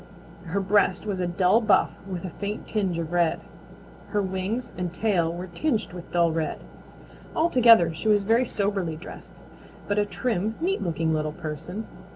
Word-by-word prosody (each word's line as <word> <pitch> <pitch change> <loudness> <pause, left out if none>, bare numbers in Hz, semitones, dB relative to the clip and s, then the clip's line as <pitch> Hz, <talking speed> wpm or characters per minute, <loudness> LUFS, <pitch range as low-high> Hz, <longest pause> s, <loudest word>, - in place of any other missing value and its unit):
Her 175 +4 -1
breast 195 0 +2
was 200 -3 -2
a 180 - 0
dull 185 +5 +3
buff 210 -4 +3 0.2
with 185 0 -4
a 180 - -5
faint 205 +4 -5
tinge 195 -6 -1
of 165 -1 -3
red. 175 -2 +2 0.7
Her 210 - 0
wings 195 +6 -3
and 180 -1 -3
tail 175 -4 +1
were 175 +2 -5
tinged 215 - -2
with 175 -1 -9
dull 170 -1 +3
red. 160 -1 -2 0.8
Altogether 235 - +5
she 165 +7 -5
was 205 -2 +4
very 225 +5 +3
soberly 200 -7 -1
dressed, 165 - -11 0.5
but 205 +1 +1
a 205 - +2
trim, 220 -2 -1
neat 375 +5 0
looking 165 -2 0
little 155 -1 -1
person. 160 +6 -6
185 Hz, 170 wpm, -26 LUFS, 170-215 Hz, 0.8 s, Altogether